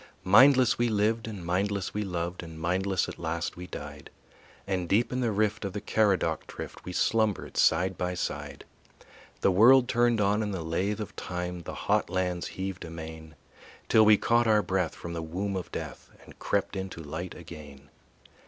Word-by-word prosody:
Mindless 125 +6 +6
we 120 0 +2
lived 110 +1 +1
and 100 -6 -7
mindless 95 +2 -1
we 105 - -2
loved 90 -3 -3
And 80 -2 -10
mindless 90 +3 0
at - - -8
last 85 +1 -3
we 90 0 -8
died; 75 -2 -8 0.6
And 90 -3 -2
deep 115 +5 +2
in 130 - -1
the 120 -3 +1
rift 105 +1 0
of 100 -2 -4
the 105 - -3
Caradoc 100 -2 +1
drift - - -8
We 90 - -6
slumbered 110 +1 0
side 90 +3 +2
by 90 0 -1
side. - - -5 0.8
The 100 - +4
world 120 +7 +6
turned 120 -2 +2
on 105 +1 +2
in 105 - -2
the 90 -4 -4
lathe 95 +6 -1
of 105 - -7
time, 90 0 -4
The - - -7
hot - - 0
lands 90 -1 -1
heaved 95 -1 -5
amain, 80 -1 -9 0.5
Till 110 - +6
we 105 -1 +7
caught 120 +2 +2
our 105 -1 +4
breath 95 -3 -1
from 85 - -7
the 85 - -3
womb 95 +5 -3
of 95 - -5
death - - -7 0.2
And - - -16
crept - - -1
into 95 -3 -5
light 80 +4 -6
again. 75 -5 -12
95 Hz, 180 wpm, -28 LUFS, 85-105 Hz, 0.8 s, we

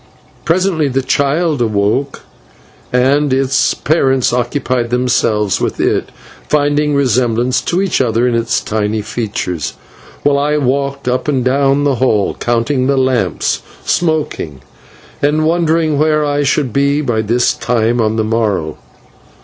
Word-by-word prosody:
Presently 170 -3 +1
the 135 0 -1
child 145 +2 0
awoke, 110 +5 0 0.7
and 135 +3 +2
its 130 -1 +1
parents 135 -5 +1
occupied 125 -1 -1
themselves 115 -5 +1
with - - -2
it, - - 0 0.4
finding 145 0 +1
resemblance 125 -1 +1
to 180 +3 0
each 190 -7 0
other 120 0 +1
in 125 - 0
its 115 0 0
tiny 105 0 -2
features, 100 - -3 0.5
while 140 -1 +2
I 150 +1 +1
walked 140 0 -1
up 125 +3 -1
and 130 -4 0
down 135 +2 +2
the 140 -3 +1
hall, 110 -6 +2
counting 120 +3 0
the 140 0 +1
lamps, 125 -9 0 0.2
smoking, 155 - -1 0.6
and 150 +2 +1
wondering 160 -2 +1
where 155 0 +2
I 145 0 0
should 140 -4 0
be 140 +1 +1
by 120 -6 0
this 120 +3 +1
time 120 0 0
on 110 0 0
the 110 - 0
morrow. 105 -8 -1
130 Hz, 135 wpm, -15 LUFS, 115-145 Hz, 0.7 s, and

